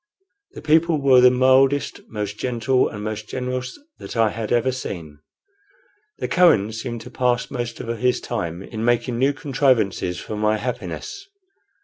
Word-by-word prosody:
The - - -10
people 160 +1 +3
were 135 -2 +5
the 125 - +8
mildest, 130 +2 +3
most 105 -1 -5
gentle, 125 +1 +1
and 105 -1 -7
most 110 0 -5
generous 125 0 -4 0.2
that - - -7
I 110 -2 +3
had 110 -1 -5
ever 120 +2 +2
seen. 85 - -7 1.0
The - - -3
Kohen 165 - +4
seemed 115 +1 -5
to - - -11
pass 125 -1 0
most 120 -3 -4
of 115 0 -4
his 125 0 +2
time 85 +2 -4
in 110 +2 -6
making 120 0 +1
new 135 +2 +3
contrivances 130 - 0
for 110 - -6
my 105 +1 +1
happiness. 255 - -5
120 Hz, 155 wpm, -22 LUFS, 110-130 Hz, 1.0 s, the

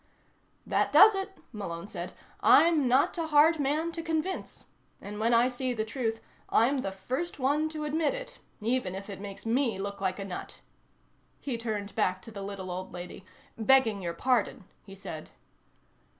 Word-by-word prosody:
"That - - +1
does 435 - +9
it," 390 0 -4
Malone 185 -6 -5
said. 185 -4 -6 0.3
"I'm 320 -5 +5
not 255 +3 +3
a 325 - -1
hard 310 +1 +5
man 300 +4 0
to 330 - -4
convince. 325 +3 -3 0.3
And 210 +1 -7
when 225 +2 +2
I 235 +1 +5
see 255 0 -2
the 220 -1 -1
truth, 225 -1 -2 0.3
I'm 260 +5 +3
the 195 - -3
first 255 - -4
one 290 +4 +1
to 310 -1 -5
admit 315 +8 0
it, - - -8 0.2
even 225 -4 0
if 200 +2 -7
it 195 - -8
makes 200 +1 -8
me 230 -2 +1
look 200 0 -5
like 185 -1 0
a 195 - -5
nut." 185 -2 -7 0.8
He 270 -4 -3
turned 215 -3 -4
back 185 0 0
to 225 - -10
the 200 -2 -7
little 195 -2 -6
old 185 +1 -5
lady. 180 +1 -8 0.4
"Begging 225 -3 +4
your 170 -2 -3
pardon," 245 -2 +1 0.2
he 195 - -10
said. 160 -5 -8
230 Hz, 175 wpm, -29 LUFS, 195-295 Hz, 0.8 s, does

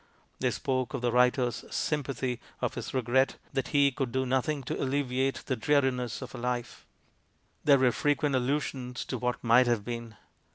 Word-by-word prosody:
They - - +2
spoke 130 +1 -1
of 135 - -3
the 120 -1 +1
writer's 125 -1 +2
"sympathy," 135 -4 -2 0.2
of - - -1
his - - -5
regret 130 +1 +2 0.2
that 135 -1 -1
he 140 -1 +4
could 130 -1 -3
do 130 +1 0
nothing 130 +3 0
to - - -3
"alleviate 135 -1 0
the 130 - 0
dreariness 130 -1 +1
of 125 - -8
her - - -8
life." 120 0 -3 0.8
There 140 -2 +7
were 130 -2 +4
frequent 145 +3 +1
allusions 130 -1 -1
to 130 - -4
what 125 +1 -2
"might 120 +2 +5
have 115 -4 +1
been." 115 -2 -5
130 Hz, 170 wpm, -29 LUFS, 125-135 Hz, 0.8 s, There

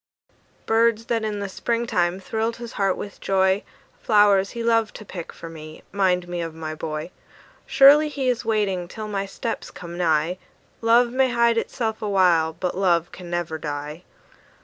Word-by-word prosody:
Birds 225 0 +2
that 230 -2 -1
in 210 -2 -3
the 200 - -2
spring 235 +4 -2
time 175 -4 0
thrilled 225 +4 -2
his 235 -1 -8
heart 195 -2 0
with 200 - -8
joy, 190 0 +2 0.4
Flowers 205 -3 +4
he 235 -1 -5
loved 230 -2 +1
to 215 - -9
pick 175 -4 -7
for 165 - -10
me, 155 -1 -11
'mind 185 -2 +1
me 175 0 -3
of 165 -1 -5
my 160 -1 -5
boy. 155 +1 -5 0.6
Surely 290 +3 +7
he 275 -3 -3
is 245 -2 0
waiting 205 -5 0
till 215 +4 -7
my 200 -1 -3
steps 225 +3 -5
come 175 0 -9
nigh; 165 +1 +1 0.4
Love 235 +1 +4
may 260 +1 +2
hide 235 -1 +3
itself 225 -2 -3
awhile, 180 -6 +3
but 175 +2 -4
love 175 -3 +1
can 180 -1 -10
never 170 -2 -3
die. 150 +2 -5
195 Hz, 170 wpm, -23 LUFS, 175-230 Hz, 0.6 s, Surely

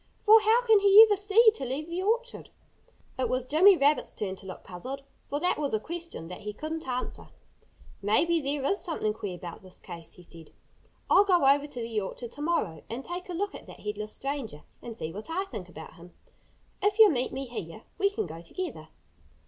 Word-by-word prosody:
For 440 +1 +8
how 450 +3 +3
can 445 -3 +5
he 405 +2 +9
ever 415 - +3
see 420 +3 +5
to 355 - -6
leave 270 +5 -3
the 340 +2 -3
orchard?" 470 +5 -1 0.7
It 260 - 0
was 255 0 0
Jimmy 355 +8 +6
Rabbit's 290 +1 +2
turn 190 -3 -4
to 195 - -11
look 185 - -9
puzzled, 255 +10 -6 0.3
for 290 - -1
that 355 0 0
was 285 -6 0
a - - 0
question 335 - -6
that 180 +2 -8
he 210 0 -5
couldn't 315 +5 -5
answer. 255 0 -4 0.7
"Maybe 315 +12 +2
there 280 0 -2
is 390 +9 +1
something 265 - -1
queer 205 -4 -5
about 175 -1 -9
this 185 -1 -10
case," 170 -1 -9
he 180 - -14
said. 165 -2 -12 0.5
"I'll 395 - +6
go 360 -7 +3
over 280 +2 +4
to 270 -4 -8
the 225 -2 -2
orchard 230 +4 -6
to 290 - -10
morrow 255 - -1
and 240 +4 -5
take 360 +1 -6
a - - -4
look 390 +3 -2
at - - -11
that - - -12
headless 210 0 -5
stranger 270 - -5 0.2
and 230 -2 -8
see 160 -5 -4
what 210 - -8
I 370 +4 -1
think 185 - -8
about 160 -2 -10
him. 175 +1 -15 0.7
If 410 +1 +1
you'll 435 -4 +8
meet 255 -3 -1
me 270 +1 -4
here 215 -4 -7 0.2
we 400 0 +3
can 400 - -3
go 165 0 -9
together." 360 - -6
275 Hz, 215 wpm, -28 LUFS, -, 0.7 s, he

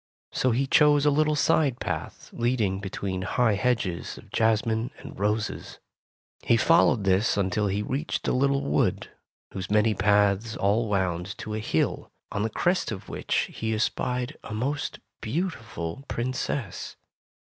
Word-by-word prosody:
So 130 - +1
he 125 +3 +1
chose 145 +1 +5
a 150 - +5
little 150 +1 +2
side 150 -4 +2
path - - -5
leading 115 -6 0
between 95 -1 -4
high 110 +4 +2
hedges 105 -5 -1
of - - -15
jasmine 110 +1 +1
and - - -11
roses. 105 +1 -2 0.6
He 115 - +3
followed 130 -4 +4
this 95 +3 +2
until 100 +1 +1
he 100 +2 -1
reached 135 +8 -2
a - - +3
little 140 +1 +2
wood, 75 +1 0 0.4
whose 95 -1 -5
many 105 +1 +3
paths 105 +2 +2
all 105 +4 +2
wound 95 -1 -1
to 110 - -6
a 110 - -2
hill, 80 -7 -1 0.2
on 105 - -2
the 110 - 0
crest 175 - 0
of 100 - -7
which - - -1
he 110 0 -2
espied 125 +5 -1
a 105 - -6
most 140 +6 -2 0.2
beautiful 115 - -3
Princess. 125 0 -3
110 Hz, 145 wpm, -26 LUFS, 100-130 Hz, 0.6 s, chose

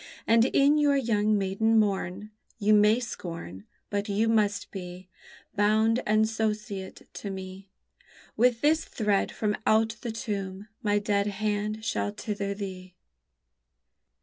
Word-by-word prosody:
And 230 +1 +5
in 285 +3 +4
your 290 -1 +3
young 215 -4 +2
maiden 200 +3 +1
morn, 205 -1 0 0.3
You 215 -1 +3
may 210 +2 +5
scorn, 165 - -7 0.3
But 205 +1 -2
you 210 +3 +1
must 205 -2 +1
be 180 -1 -8 0.5
Bound 220 +3 +3
and 215 +1 +3
sociate 210 -3 -3
to 205 - -6
me; 190 0 -8 0.7
With 240 0 +3
this 310 +2 +3
thread 210 -3 0
from 210 -1 -1
out 225 +1 +3
the 235 - -3
tomb 200 -3 -5
my 205 -3 +1
dead 205 -1 0
hand 210 +1 -2
shall 205 - -1
tether 205 -1 -4
thee! 185 -2 -7
210 Hz, 130 wpm, -27 LUFS, 200-220 Hz, 0.7 s, And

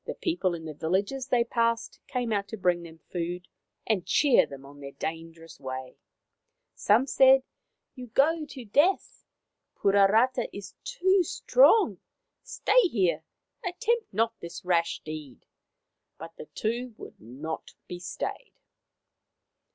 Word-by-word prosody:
The - - -5
people 200 - -1
in 165 -1 -9
the 155 - -6
villages 200 - -1
they 245 -3 +3
passed 230 -1 -1
came 245 -3 -2
out 200 -1 -1
to 220 - -7
bring 180 -2 +1
them 165 -1 -11
food 175 0 -4 0.4
and 210 -5 +1
cheer 285 - +4
them 135 -1 -11
on 140 +1 -14
their 140 -1 -9
dangerous 165 +2 -7
way. 130 -1 -7 0.7
Some 225 +6 +3
said: 265 -1 +5 0.2
" - - -55
You 250 -2 -9
go 305 +7 +2
to 260 -4 -9
death. 295 - +1 0.5
Puarata 205 +6 +3
is 195 -2 -9
too 390 -6 +2
strong. 400 - +4 0.4
Stay - - +2
here. 175 - 0 0.4
Attempt 435 +6 -1
not 225 +3 +1
this 170 +1 -9
rash 170 -2 +1
deed." 155 -5 -8 0.7
But 165 +1 -10
the - - -10
two 235 +2 -3
would - - -12
not 140 +8 -7
be 180 - -7
stayed. 185 - -5
200 Hz, 135 wpm, -27 LUFS, 165-265 Hz, 0.7 s, said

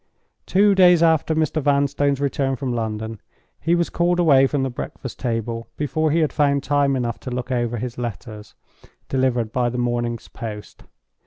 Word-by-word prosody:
Two 200 +2 +4
days 180 -3 +6
after 160 -1 +3
Mr. 155 0 0
Vanstone's 140 0 +1
return 135 -1 0
from 130 -1 -3
London, 110 -1 -4 0.4
he 170 +2 +1
was 170 -1 0
called 175 +1 +1
away 140 -6 +5
from 140 -1 -1
the 135 - -2
breakfast 125 +1 -7
table 115 -1 -3
before 155 +2 0
he 165 +3 +2
had 155 - 0
found 140 -2 +2
time 145 -1 +2
enough 120 -2 -2
to - - -7
look 125 +1 -4
over 120 -1 -1
his 120 +1 -5
letters, 110 -2 -7 0.5
delivered 125 -4 0
by 125 0 +1
the 125 - -5
morning's 120 -1 -2
post. 105 -2 -9
135 Hz, 170 wpm, -22 LUFS, 120-150 Hz, 0.5 s, days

